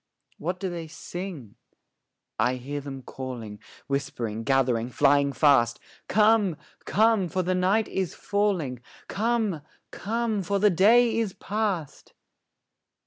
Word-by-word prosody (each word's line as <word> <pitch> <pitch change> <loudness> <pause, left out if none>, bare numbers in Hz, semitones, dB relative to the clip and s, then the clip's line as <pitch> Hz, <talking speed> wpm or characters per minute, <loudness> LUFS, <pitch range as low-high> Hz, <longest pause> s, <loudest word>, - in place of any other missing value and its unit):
What 180 +4 -3
do 195 - -2
they 170 -2 -5
sing? 160 - -8 0.8
I 125 +3 +2
hear 140 +3 -5
them 135 -2 -8
calling, 120 -7 -7 0.3
Whispering, 125 -6 -3
gathering, 125 -3 +1
flying 140 +1 +3
fast, 135 -6 +3 0.3
'Come, 210 -5 +3 0.3
come, 215 -3 +3
for 185 +1 -1
the 185 +1 0
night 190 +4 +2
is 190 -3 -3
falling; 185 - -1 0.3
Come, 215 -6 0 0.3
come, 225 0 -2
for 200 +2 -1
the 205 +1 +4
day 225 +6 +4
is 215 -5 -1
past!' 200 -7 -3
175 Hz, 120 wpm, -26 LUFS, 135-205 Hz, 0.8 s, the